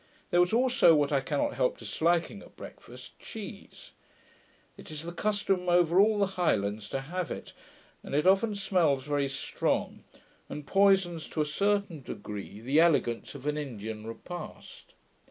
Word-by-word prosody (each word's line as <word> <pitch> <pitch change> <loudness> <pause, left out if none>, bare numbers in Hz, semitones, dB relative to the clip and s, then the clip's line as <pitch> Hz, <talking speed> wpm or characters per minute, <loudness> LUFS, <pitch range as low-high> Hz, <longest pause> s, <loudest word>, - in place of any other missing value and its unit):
There 175 - +4
was 180 0 +4
also, 245 -7 +5
what 145 -1 +2
I 140 -2 +2
cannot 145 +2 -1
help 125 - 0
disliking 165 +4 0
at - - -16
breakfast, - - -12
cheese: - - -10 0.8
it - - -13
is 155 0 -6
the 170 - -5
custom 195 -1 0
over 175 0 +4
all 210 +1 +5
the 200 - +3
Highlands 110 - -1
to 135 - -2
have 175 +5 -4
it; - - -7 0.5
and - - -5
it 150 - +2
often 195 +3 +4
smells 170 -9 +1
very 145 -1 0
strong, 135 0 -2 0.5
and 150 - -6
poisons 190 -1 +3
to 155 - -1
a - - +1
certain 200 0 0
degree 105 -3 -7
the 135 +6 +2
elegance 145 -8 +2
of 140 0 -10
an 150 0 0
Indian 110 -5 -6
repast. 175 +9 -9
160 Hz, 155 wpm, -29 LUFS, 135-185 Hz, 0.8 s, also